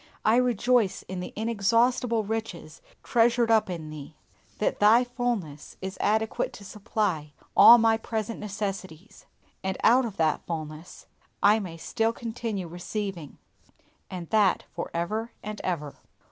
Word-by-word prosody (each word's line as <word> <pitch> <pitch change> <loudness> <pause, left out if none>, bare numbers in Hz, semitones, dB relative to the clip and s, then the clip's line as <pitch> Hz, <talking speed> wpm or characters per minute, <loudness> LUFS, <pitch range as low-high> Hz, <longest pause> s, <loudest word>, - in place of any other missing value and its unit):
I 220 +2 +5
rejoice 245 -3 +2
in 185 0 -6
the 180 - -6
inexhaustible 230 +2 +1
riches 210 -7 -5 0.2
treasured 235 0 +3
up 220 -3 +3
in 160 -4 -6
Thee 150 0 -9 0.4
that 210 - -1
Thy 220 +4 +6
fullness 240 - -4
is 190 +1 -6
adequate 220 +1 0
to 200 - -11
supply 190 -7 -2 0.2
all 240 - +10
my 225 -1 +3
present 220 0 -4
necessities; 195 -3 -6 0.4
and 190 0 -2
out 250 +2 +5
of 220 -4 -6
that 155 -2 +1
fullness 155 0 -7 0.4
I 210 +2 +6
may 180 -5 -7
still 225 +7 -1
continue 225 -5 -4
receiving, 175 -1 -5 0.7
and 180 -3 -6
that 210 -4 +3
for - - -5
ever 215 +7 -3
and 210 +1 -6
ever! 150 -6 -3
210 Hz, 135 wpm, -27 LUFS, 175-230 Hz, 0.7 s, all